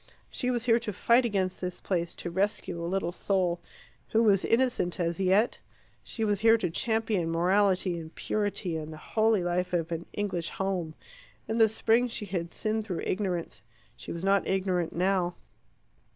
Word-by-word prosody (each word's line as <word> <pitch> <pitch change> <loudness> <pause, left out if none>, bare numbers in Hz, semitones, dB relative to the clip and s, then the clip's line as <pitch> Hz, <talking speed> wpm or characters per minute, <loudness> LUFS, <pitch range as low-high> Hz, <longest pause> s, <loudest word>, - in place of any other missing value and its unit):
She 250 - -1
was 245 -1 -1
here 230 -1 +4
to 230 -2 -4
fight 235 +5 +3
against 190 -5 -1
this 180 -1 -4
place, 175 -3 -2
to 175 - -6
rescue 190 -2 -1
a 170 - -2
little 185 -2 -1
soul 180 -2 0 0.5
who 225 +1 +4
was 200 -4 +4
innocent 230 -7 +1
as 170 0 -1
yet. 195 +5 +2 0.4
She 225 - -4
was 205 -2 +1
here 225 +1 +6
to 180 -6 -2
champion 220 -3 0
morality 185 +1 +2
and 160 0 -10
purity, 200 -5 -1
and 155 0 -6
the 155 - -8
holy 220 +2 +1
life 180 +1 -1
of 170 -1 0
an 165 0 -4
English 185 -5 -2
home. 185 -5 -2 0.5
In 225 +1 -1
the 220 -1 +6
spring 225 +3 +2
she 225 -3 -5
had 175 -3 -3
sinned 220 0 -1
through 190 -5 -4
ignorance; 180 - -2 0.3
she 120 - -8
was 170 +1 -5
not 195 +1 +2
ignorant 185 -3 0
now. 180 0 +1
190 Hz, 175 wpm, -28 LUFS, 175-215 Hz, 0.5 s, here